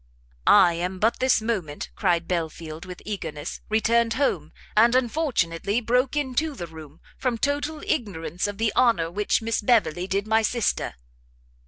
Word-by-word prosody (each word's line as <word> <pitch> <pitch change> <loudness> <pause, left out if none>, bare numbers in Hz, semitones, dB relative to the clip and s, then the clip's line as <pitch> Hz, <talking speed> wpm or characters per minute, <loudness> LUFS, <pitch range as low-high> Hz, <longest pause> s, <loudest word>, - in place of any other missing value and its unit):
"I 175 - +7
am 180 +3 -3
but 220 +5 +1
this 255 -4 +3
moment," 185 -11 -3
cried 175 -4 +1
Belfield, 165 -1 -4
with 180 -1 -10
eagerness, 165 -7 -5
"returned 230 +1 +2
home; 280 +2 0 0.2
and 235 +3 +5
unfortunately 235 - 0
broke 250 +4 +1
into 295 +1 -1
the 175 - -5
room, 160 -2 -12 0.2
from 250 -3 0
total 290 +4 -2
ignorance 185 - -2
of 205 -1 -5
the 225 0 0
honour 225 -10 +3
which 210 +4 0
Miss 225 0 0
Beverley 200 -6 +2
did 195 +1 -1
my 220 +1 +3
sister." 225 - -1
215 Hz, 150 wpm, -25 LUFS, 170-245 Hz, 0.2 s, I